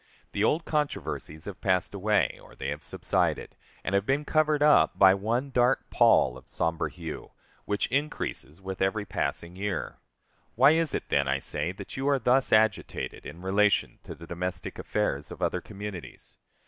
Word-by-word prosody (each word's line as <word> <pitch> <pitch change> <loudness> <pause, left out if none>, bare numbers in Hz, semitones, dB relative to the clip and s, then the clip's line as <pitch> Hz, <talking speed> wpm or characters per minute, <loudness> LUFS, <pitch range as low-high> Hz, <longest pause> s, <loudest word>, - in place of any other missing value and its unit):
The - - -1
old 165 +1 +2
controversies 145 - -3
have 100 -3 -8
passed 95 -1 +1
away, 105 0 +1
or - - -16
they - - -4
have - - -4
subsided, - - -1 0.3
and - - -3
have 100 0 +3
been 140 +6 0
covered 155 -1 +2
up 150 -1 +5
by 95 -1 +7
one 115 +8 -1
dark 125 +1 +2
pall 65 0 +4
of - - -24
somber 80 0 -1
hue, 80 -3 -8 0.3
which 100 0 0
increases 135 - -2
with 95 0 -6
every 100 +2 +1
passing 85 -2 -3
year. 95 -3 -3 0.6
Why 135 +5 +7
is 165 0 +2
it, - - -4
then, 70 -1 +2
I 70 0 +2
say, 80 +5 -2
that 100 +5 -9
you 135 +2 0
are 140 - +4
thus 130 +1 +2
agitated 110 -3 +1
in 85 +2 -10
relation 100 +2 +2
to - - -7
the 85 - -11
domestic 85 +1 -4
affairs 75 -10 -1
of - - -9
other - - 0
communities? 100 -3 -9
100 Hz, 175 wpm, -28 LUFS, 90-130 Hz, 0.6 s, by